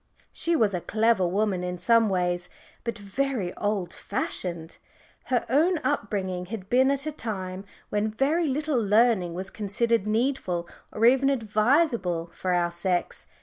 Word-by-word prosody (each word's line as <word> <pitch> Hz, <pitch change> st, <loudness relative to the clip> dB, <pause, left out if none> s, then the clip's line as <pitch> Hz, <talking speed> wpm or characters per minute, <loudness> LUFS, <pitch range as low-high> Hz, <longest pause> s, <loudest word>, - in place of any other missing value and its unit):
She 335 Hz, 0 st, 0 dB
was 220 Hz, -9 st, +2 dB
a 180 Hz, -, -2 dB
clever 215 Hz, -3 st, +2 dB
woman 195 Hz, 0 st, 0 dB
in 180 Hz, 0 st, -3 dB
some 230 Hz, +3 st, +4 dB
ways, 180 Hz, -1 st, -1 dB, 0.3 s
but 235 Hz, -2 st, -3 dB
very 205 Hz, -1 st, -2 dB
old 200 Hz, -4 st, -2 dB
fashioned. 175 Hz, -7 st, -4 dB, 0.5 s
Her 250 Hz, -2 st, 0 dB
own 325 Hz, +8 st, +3 dB
upbringing 190 Hz, -9 st, -2 dB
had 195 Hz, -2 st, -7 dB
been 260 Hz, +2 st, +5 dB
at 280 Hz, +1 st, 0 dB
a 310 Hz, -, -2 dB
time 195 Hz, -7 st, -5 dB, 0.2 s
when 210 Hz, +1 st, 0 dB
very 290 Hz, +9 st, +1 dB
little 285 Hz, -3 st, 0 dB
learning 205 Hz, -4 st, +3 dB
was 190 Hz, +2 st, -5 dB
considered 215 Hz, +1 st, 0 dB
needful 215 Hz, -7 st, 0 dB, 0.2 s
or 220 Hz, -, +1 dB
even 265 Hz, +3 st, +5 dB
advisable 215 Hz, -, +1 dB
for 185 Hz, -, -2 dB
our 175 Hz, -1 st, +1 dB
sex. 175 Hz, +1 st, -2 dB
215 Hz, 145 wpm, -26 LUFS, 185-250 Hz, 0.5 s, been